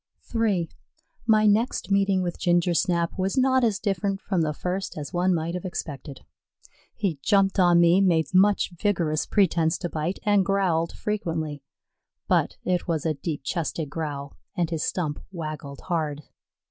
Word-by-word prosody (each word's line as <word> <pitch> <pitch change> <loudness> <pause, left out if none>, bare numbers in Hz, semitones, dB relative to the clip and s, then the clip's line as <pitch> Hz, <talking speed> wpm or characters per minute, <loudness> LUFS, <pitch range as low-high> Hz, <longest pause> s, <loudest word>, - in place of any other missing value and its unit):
III 210 -7 +1 0.6
My 215 -1 +5
next 215 +1 +1
meeting 195 -1 +3
with 175 -1 -4
Gingersnap 175 0 +1
was 190 +4 -1
not 260 0 +3
as 220 -4 +2
different 195 -1 -1
from 190 -4 -1
the 155 -1 +1
first 180 +5 -4
as 145 -2 -6
one 180 +1 +2
might 165 -1 -1
have 180 - -4
expected. 145 -7 -6 0.7
He 180 -9 -2
jumped 195 +2 +2
on 175 -2 +5
me, 170 +3 +5
made 170 -3 +2
much 195 +1 +4
vigorous 170 -4 0
pretense 170 -5 +2
to 175 - -4
bite, 160 +4 -2
and 205 -2 +3
growled 180 -4 +1
frequently, 160 -8 -3 0.7
but - - +1
it 180 -1 0
was 165 -3 -1
a 160 - +2
deep 150 +1 -4
chested 160 -1 -3
growl 145 -3 -4 0.2
and 175 -2 0
his 160 -2 -2
stump 155 -5 -2
waggled 155 -5 -6
hard. 155 -4 -2
175 Hz, 155 wpm, -25 LUFS, 160-195 Hz, 0.7 s, My